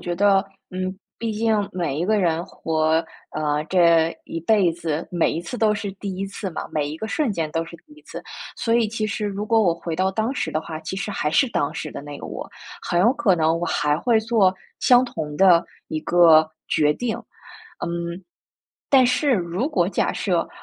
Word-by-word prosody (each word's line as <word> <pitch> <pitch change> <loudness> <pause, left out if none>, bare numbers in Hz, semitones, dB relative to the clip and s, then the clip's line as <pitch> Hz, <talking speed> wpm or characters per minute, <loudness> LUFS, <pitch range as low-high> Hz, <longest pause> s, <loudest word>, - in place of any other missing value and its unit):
觉 175 0 -3
得， 195 0 +4 0.3
嗯， 185 +1 -3 0.2
毕 230 -1 -2
竟 220 +1 +1 0.2
每 170 -6 -2
一 175 - -1
个 215 -1 +3
人 170 -3 +1
活， 160 0 0 0.3
呃， 150 -1 -1
这 170 -3 +4
一 165 - -5
辈 190 -1 +3
子， 165 -1 -3
每 175 -2 +1
一 165 - -3
次 210 +8 -6
都 215 -1 +3
是 205 -1 -4
第 195 -1 -6
一 195 +1 -3
次 195 0 -5
嘛， 165 - -5
每 150 -2 0
一 150 - -5
个 220 - -5
瞬 295 +1 0
间 165 -6 -2
都 165 0 0
是 170 - -10
第 305 - -19
一 305 - -16
次， - - -9 0.3
所 230 - 0
以 235 -2 +3
其 215 0 -2
实 210 0 -2
如 205 0 -3
果 225 +1 +3
我 175 -6 +3
回 170 0 -5
到 185 +3 +1
当 220 +5 -1
时 - - -2
的 155 - 0
话， 160 0 -7
其 160 +4 -5
实 200 +2 -3
还 150 -6 -1
是 215 - +4
当 145 -7 0
时 155 - -5
的 - - -6
那 145 0 -8
个 - - -7
我， - - -7 0.3
很 175 - -1
有 225 +8 +5
可 240 -10 +2
能 160 0 +2
我 175 - -1
还 150 0 +1
会 230 +3 +3
做 220 -4 +2 0.3
相 250 0 +5
同 155 -10 -5
的 180 -2 +6 0.3
一 155 - -3
个 160 -2 +5 0.2
决 150 -1 +2
定。 235 +2 -2 0.7
嗯， 170 +1 -4 0.7
但 265 -2 +6
是 265 +3 +2
如 185 - -1
果 180 - +1
假 - - 0
设， 180 -4 0
180 Hz, 230 characters per minute, -23 LUFS, 165-215 Hz, 0.7 s, 的